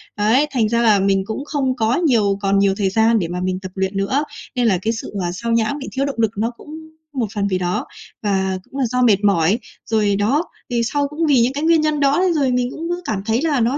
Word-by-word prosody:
Ấy, 225 +8 +3
thành 225 -5 +1
ra 235 0 +1
là 215 -4 +4
mình 195 0 +2
cũng 225 +7 -5
không 270 -4 -1
có 225 +1 +1
nhiều 225 - +2
còn 195 0 +2
nhiều 200 -1 +3
thời 195 -2 +1
gian 220 +2 +3
để 170 - -2
mà 180 +1 -4
mình 185 0 -1
tập 185 -1 -7
luyện 190 +1 -2
nữa. 200 +9 0 0.3
Nên 245 -1 +1
là 190 -4 +3
cái 225 +3 0
sự, 220 - -7
ờ, 175 - -1
xao 230 +6 -4
nhãng, 230 +5 +1
bị 270 - -7
thiếu 270 +1 -1
động 280 - -3
lực 220 -2 +2
nó 225 +3 0
cũng - - -14 0.4
một 240 -5 -1
phần 200 -1 0
vì 185 -2 0
đó 180 0 -2 0.4
và 190 -2 0
cũng 275 - -9
là 265 - +2
do 250 +2 -1
mệt 210 -4 +3
mỏi, 200 +2 +3 0.3
rồi 210 -3 +1
đó. 245 - +1 0.3
Thì 240 -1 0
sau 285 -1 +1
cũng 310 +3 -2
vì 270 -5 +4
những 245 +3 +1
cái 290 +2 -3
nguyên 325 -1 +4
nhân 305 -1 0
đó 280 +2 +3
nên 365 -2 +2
rồi 275 -5 +1
mình 250 0 0
cũng 330 +2 -6
cứ 350 +1 -2
cảm 200 -3 -2
thấy 225 +2 +1
là 300 -5 +1
nó 240 +5 +1
230 Hz, 270 wpm, -19 LUFS, 200-275 Hz, 0.4 s, là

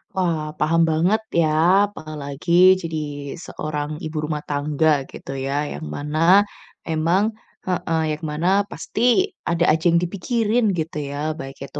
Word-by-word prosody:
Wah, 160 -5 -1
paham 165 +2 +3
banget 175 +8 +2 0.2
ya, 155 - +3 0.4
apalagi 150 -1 -6 0.3
jadi 165 -1 -4 0.5
seorang 150 -1 -4
ibu 155 0 -5
rumah 150 -1 -2
tangga 145 0 +1
gitu - - -9
ya. 135 0 -3 0.2
Yang - - -7
mana, 150 +2 -3 0.7
emang 165 +4 +2 0.4
heeh, 165 -3 0
yang 155 - -16
mana 160 +4 -1 0.2
pasti 245 - +1 0.2
ada 170 0 0
aja 160 +1 0
yang 170 - +4
dipikirin 220 +4 0
gitu 155 -1 -4
ya. 155 +2 -3
Baik 135 0 -8
itu 145 - -8
155 Hz, 135 wpm, -22 LUFS, 150-175 Hz, 0.7 s, yang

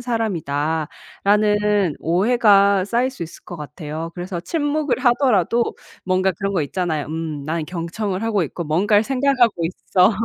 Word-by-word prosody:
사람이다.'라는 205 - 0
오해가 200 +1 +4
쌓일 240 +5 0
수 260 - -8
있을 170 - -9
것 175 - -8
같아요. 155 +2 -6
그래서 175 0 -4
침묵을 300 - -1
하더라도 240 - +2 0.3
뭔가 185 +1 +2
그런 195 0 -2
거 170 -5 +1
있잖아요. 160 -1 -2
음 155 -2 -5
난 160 +1 -2
경청을 185 +4 -4
하고 210 -5 +1
있고 165 +3 -4
뭔가를 205 +7 +2
생각하고 255 -8 +2
있어. 185 +2 +2
190 Hz, 320 characters per minute, -21 LUFS, 165-225 Hz, 0.3 s, 오해가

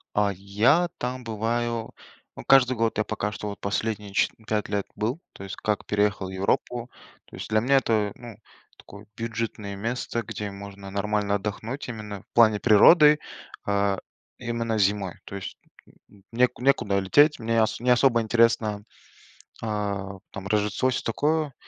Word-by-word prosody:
А 105 -1 +2
я 110 - +2
там 125 +1 -4
бываю, 115 +1 -2 0.4
ну, - - -9
каждый 130 -2 +5
год. 115 -1 0
Я 105 - +2
пока 105 - -3
что 105 - -5
вот 100 - -7
последние 105 0 -2
че - - +3 0.2
5 105 -2 -1
лет 100 -1 -1
был, 120 +10 -2
то 95 - -10
есть 95 - -6
как 105 -2 -2
переехал 105 -2 0
в - - -7
Европу. 115 +6 -1 0.4
То - - -13
есть - - -7
для 110 0 +3
меня 135 +4 +3
это, 110 -5 +1
ну, 120 -3 -11 0.4
такое 100 +1 -14
бюджетное 110 -3 -4
место, 115 +2 -3
где 105 -1 -5
можно 100 0 -9
нормально 100 0 0
отдохнуть, 110 +7 -5
именно 105 -4 -7
в - - -39
плане 110 -3 +5
природы, 150 - +7 0.5
а, 100 -1 +1 0.4
именно 115 -2 -2
зимой, 100 -2 +1
то 100 - -7
есть, 95 - -7 0.3
н - - -22 0.2
н 95 - -23
не 125 +2 +4
некуда 120 -7 +2
лететь, 145 +11 +4
мне 115 +1 -2
н 110 -1 +5
не 125 - -1
особо 125 -1 +4
интересно, 110 -2 +2 0.8
э, 115 - -4 0.6
там 100 -1 -7
Рождество, 105 +4 +1
всё 130 - -1
такое. 150 +4 0
110 Hz, 165 wpm, -25 LUFS, 100-120 Hz, 0.8 s, природы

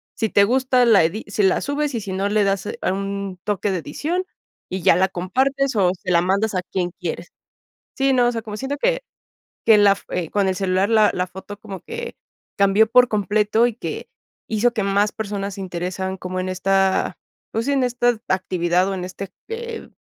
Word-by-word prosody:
Si 220 -2 -1
te 200 - +5
gusta 255 +2 +3
la 215 -6 +6
edi 175 +7 -2
si 205 +1 -1
la 190 - +3
subes 285 -1 -2
y 230 - 0
si 195 -2 -6
no 195 +2 -1
le 210 0 +2
das 195 -1 0
un 195 0 -3
toque 205 -1 -1
de 185 - -1
edición 320 - -3 0.5
y 185 -1 -4
ya - - +6
la 190 +2 +3
compartes 265 +9 0
o 185 -4 +3
se 185 - -3
la 170 - +4
mandas 200 +4 +1
a 180 - +1
quien 180 -1 -3
quieres. 175 -1 -4 0.7
Sí, 270 0 +2
no, 245 -2 +4
o - - 0
sea, 225 -1 -4
como 210 -1 -7
siento 270 +4 -3
que - - +1 0.6
que 220 -2 +6
la 205 -1 +6
f 200 - -5
eh, 175 -3 -3
con 200 -2 +1
el 185 - 0
celular, 190 +1 +1
la 215 -2 +5
la 180 - -1
foto 190 +2 -9
como 195 -3 -8
que 470 +1 -7 0.4
cambió 200 +3 +4
por 250 +1 +6
completo 210 +2 +2
y 230 - -6
que - - -6 0.4
hizo 225 +2 +2
que 215 - 0
más 200 +1 +1
personas 200 -2 -4
se 195 - -8
interesan 185 +1 -4
como 185 0 -4
en 185 - -3
esta, 190 +1 +1 0.3
pues, 230 +3 -1
sí 285 - +1
en 270 -2 +2
esta 245 -2 +1
actividad 180 -1 +1
o 195 - -2
en 180 -1 -4
este, 185 +1 -7 0.2
eh, 460 0 -6
200 Hz, 210 wpm, -21 LUFS, 185-235 Hz, 0.7 s, la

